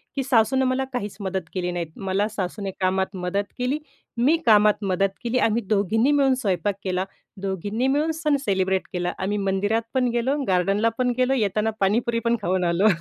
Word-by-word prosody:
की 275 - -1
सासूनं 260 +1 +3
मला 255 +1 +1
काहीच 210 -5 -3
मदत 190 -1 -2
केली 180 -1 -2
नाहीत. 175 -2 -3
मला 195 +1 -1
सासूने 200 -1 -4
कामात 190 +1 0
मदत 185 +2 -1
केली, 255 +4 -1 0.4
मी 280 +8 +4
कामात 210 -1 +5
मदत 195 0 +1
केली, 240 +1 0
आम्ही 225 0 +2
दोघींनी 220 +6 +2
मिळून 280 -2 +4
स्वयंपाक 205 -4 -1
केला, 185 0 -1 0.4
दोघींनी 205 +6 -2
मिळून 295 +4 +1
सण 310 -2 0
सेलिब्रेट 190 -2 0
केला, 180 0 -1
आम्ही 200 +2 -1
मंदिरात 200 +3 0
पण 255 -2 +2
गेलो, 240 +4 +1
गार्डनला 195 +4 +2
पण 250 -1 +1
गेलो, 255 +1 +2
येताना 215 -3 +1
पाणीपुरी 230 +4 +1
पण 235 0 +3
खाऊन 185 -1 0
आलो. 175 +4 +3
210 Hz, 175 wpm, -24 LUFS, 190-250 Hz, 0.4 s, कामात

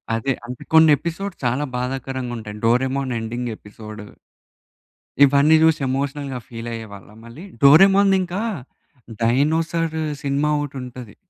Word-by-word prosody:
అదే. 130 +4 -1
అంటే 125 0 -8
కొన్ని 160 0 +7
ఎపిసోడ్స్ 175 +2 -5
చాలా 125 +4 0
బాధాకరంగా 130 0 -4
ఉంటాయి. 105 -1 -8
'Doraemon' 130 +2 +1
ending 120 +1 -4
episode. 105 0 -11 1.2
ఇవన్నీ 140 +3 +4
చూసి 160 -2 +3
ఎమోషనల్‌గా 140 0 -3
ఫీల్ 115 0 -7
అయ్యేవాళ్లా 105 -2 -10
మళ్ళీ. 130 +11 -11 0.2
'డోరేమోన్‌ది' 195 +6 +6
ఇంకా 180 +4 -4 0.8
డైనోసార్ 160 +6 +1 0.3
సినిమా 140 +2 0
ఒకటి 140 -2 -5
ఉంటది. 125 -3 -10
135 Hz, 115 wpm, -21 LUFS, 120-155 Hz, 1.2 s, కొన్ని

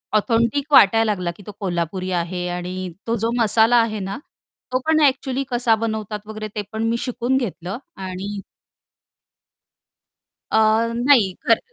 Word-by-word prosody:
authentic 235 +6 +1
वाटायला 225 0 +7
लागला 180 -4 -2
की 200 - -13
तो - - -5
कोल्हापुरी 185 0 -2
आहे 180 0 -2
आणि 180 +1 -4 0.2
तो 230 - +1
जो 225 +2 -1
मसाला 225 +2 +4
आहे 215 -2 -2
ना, 195 +6 -4 0.5
तो 255 - +1
पण 315 0 +3
ॲक्चुअली 270 -1 +1
कसा 240 -2 +2
बनवतात 220 -1 -3
वगैरे 215 0 -6
ते 210 - -1
पण 220 +1 -3
मी 235 - 0
शिकून 250 +1 -1
घेतलं 195 -4 -4 0.2
आणि 190 +2 -5 2.1
अ, - - +3 0.4
नाही 240 -7 +4
घर 230 -1 +6
220 Hz, 145 wpm, -21 LUFS, 185-235 Hz, 2.1 s, वाटायला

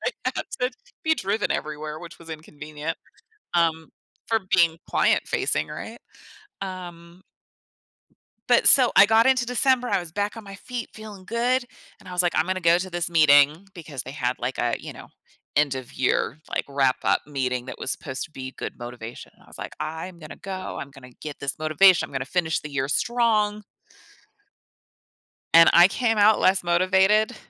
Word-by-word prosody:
I - - +2 0.2
had - - -3 0.2
to 250 0 +1 0.3
be 315 0 +3
driven 205 -4 -2
everywhere, 150 0 -5
which 170 +1 -11
was 165 -1 -13
inconvenient, 155 0 -7 0.6
um, 160 -2 +1 0.4
for 225 -1 +1
being 165 -2 +3
client - - +3
facing, - - -1
right? - - -8 0.6
Um... 175 -2 -8 1.3
But - - +4
so 255 -3 +7
I 195 - +9
got 225 +2 +4
into 255 -2 +3
December, 250 0 +2
I - - +2
was 175 -2 -9
back 205 +3 -2
on 225 - -9
my 195 -1 -10
feet 245 +3 -7
feeling 210 -3 -11
good. 245 +4 0 0.3
And 205 - -17
I 180 - -8
was 180 0 +2
like, 175 - +1
"I'm 160 - +2
gonna 185 0 -2
go 170 0 +5
to 185 +1 -4
this 175 -1 -2
meeting." 155 +2 +4
Because 150 -6 -7
they - - -8
had 125 -3 -2
like 130 - -3
a, 120 0 0
you - - -9
know, - - -12 0.5
end 145 -2 +2
of 130 -2 -7
year, 130 +2 0
like, - - -1
wrap 135 -2 +2
up - - +2
meeting 130 -4 -2
that 130 - -8
was 135 - -2
supposed 130 -1 -5
to - - -11
be 130 -2 -7
good - - -5
motivation. 120 -1 -9
I - - -24
was - - -14
like, - - -7
"I'm 160 +3 -6
gonna 155 -2 -10
go, 190 -1 -6
I'm 140 - -8
gonna 130 -2 -14
get 150 -2 -7
this 140 +1 -4
motivation, 165 +4 +4
I'm - - -17
gonna 135 -1 -3
finish 160 +1 -1
the 150 - -8
year 135 -1 -1
strong" 215 - +1 1.9
and 165 0 +8
I 175 +1 +8
came 225 +2 0
out 210 +1 +5
less 185 0 +3
motivated 190 +6 +3
170 Hz, 185 wpm, -24 LUFS, 150-205 Hz, 1.9 s, I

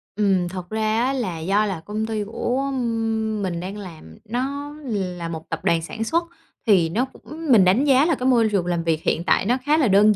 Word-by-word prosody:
Ừm, 195 -4 +2
thật 180 -1 -7
ra 220 +1 0
á 265 +2 +1
là 220 -11 -2
do 195 +6 +2
là 190 -5 -3
công 215 +1 -2
ty 220 -1 -2
của 250 +6 -2 0.7
mình 180 -3 -2
đang 190 +4 -6
làm, 160 - -10
nó 280 +5 -3
là 180 -7 -3
một 160 -1 -7
tập 165 - -3
đoàn 165 -1 +3
sản 220 +7 -5
xuất. 330 +9 +1 0.4
Thì 180 -6 +4
nó 230 +10 0
cũng 305 +3 -6
mình 210 -6 +7
đánh 195 +9 +4
giá 275 0 +5
là 330 -2 +2
cái 255 0 -2
môi 235 -4 +4
trường 195 -4 +1
làm 175 -1 -1
việc 165 -1 0
hiện 165 - 0
tại 185 - +2
nó 245 +5 +2
khá 300 +2 +4
là 295 -6 +3
đơn 205 +1 +5
210 Hz, 225 wpm, -22 LUFS, 180-250 Hz, 0.7 s, mình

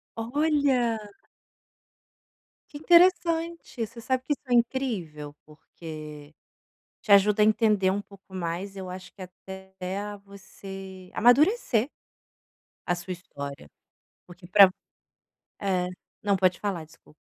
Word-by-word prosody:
Olha! 265 -1 +1 1.7
Que 290 - -7
interessante, 335 -4 +3
você 230 +2 -13
sabe 255 +2 -1
que 295 - 0
isso 285 - -11
é 245 - 0
incrível? 210 - -1
Porque, 155 -1 -11 0.7
te 205 - 0
ajuda 205 +2 +6
a - - +7
entender 210 -3 +3
um 205 - -2
pouco 195 -1 -17
mais, 180 +2 -4
eu 185 -1 -6
acho 185 0 -9
que 195 - -10
até 190 +1 -11 0.5
você 195 -1 -11
amadurecer, 260 - +4 1.0
a 175 - 0
sua 180 +1 -6
história. 140 - -8 0.6
Porque 175 0 -14
para 195 0 +8 0.9
É 185 -2 0 0.3
Não, 200 -1 +2
pode 185 -1 +2
falar, 190 -6 -3
desculpa. 155 -1 -21
195 Hz, 115 wpm, -26 LUFS, 180-240 Hz, 1.7 s, para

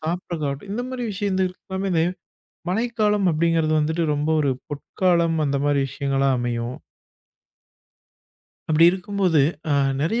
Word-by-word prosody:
சாப்ரதாகட்டும், 160 -1 -4
இந்த 245 +4 -2
மாரி 255 -1 -4
விஷயந்தே 190 -1 0
எல்லாமேந்த 190 -3 -2 0.7
மழைக்காலம் 210 -1 +1
அப்டிகிங்றது 160 0 +1
வந்துட்டு, 160 +2 0
ரொம்ப 150 +2 -1
ஒரு 140 -2 +1 0.2
பொற்காலம் 165 +2 0
அந்த 140 0 0
மாதரி 145 -1 +2
விஷயங்களா 135 0 0
அமையும். 120 0 -3 1.9
அப்டி 160 +2 +5
இருக்கும்போது, 190 -4 +1 0.3
அ - - +3 0.3
நெறைய 200 +11 0
165 Hz, 110 wpm, -23 LUFS, 145-190 Hz, 1.9 s, அப்டி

